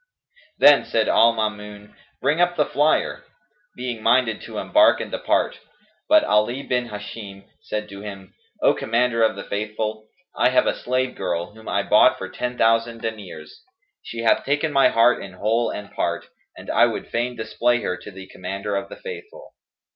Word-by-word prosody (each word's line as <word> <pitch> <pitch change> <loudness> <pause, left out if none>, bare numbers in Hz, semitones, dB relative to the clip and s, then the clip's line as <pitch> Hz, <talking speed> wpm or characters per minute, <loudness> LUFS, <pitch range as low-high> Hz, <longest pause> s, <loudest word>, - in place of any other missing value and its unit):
Then 145 -1 +7
said 110 -1 0
al 115 +1 +5
Maamun, 105 -2 -5 0.3
"Bring 160 +4 +2
up 175 0 +2
'the 150 - +2
Flyer,'" 150 +3 +1 0.5
being 125 -3 -5
minded 120 -2 +2
to 110 -2 -8
embark 315 - +4
and - - -6
depart: - - 0 0.5
but 315 0 +6
Ali 120 +6 +1
bin 125 -1 -1
Hisham 105 -1 -8 0.2
said 105 0 -4
to 100 0 -9
him, 100 -2 -9 0.3
"O - - +5
Commander 115 0 0
of 110 - +3
the 100 - -7
Faithful, 110 +1 -4 0.3
I - - +3
have - - +3
a - - +1
slave 130 +1 -2
girl, 90 -1 -3
whom 110 0 -11
I - - 0
bought - - +5
for - - -6
ten 125 0 -4
thousand 115 0 +1
diners; 110 - -7 0.4
she 115 0 -6
hath 115 - +3
taken 145 +2 0
my 135 - +5
heart 115 +1 +3
in 95 - -9
whole 110 +5 0
and 105 -1 -7
part, 85 0 -2 0.3
and - - -7
I - - +5
would - - -5
fain 120 +1 -2
display 120 +2 0
her 90 - -1
to - - -11
the 95 -1 -10
Commander 100 +2 -5
of 100 0 -3
the - - -10
Faithful. 450 +1 -10
115 Hz, 175 wpm, -22 LUFS, 105-125 Hz, 0.5 s, Then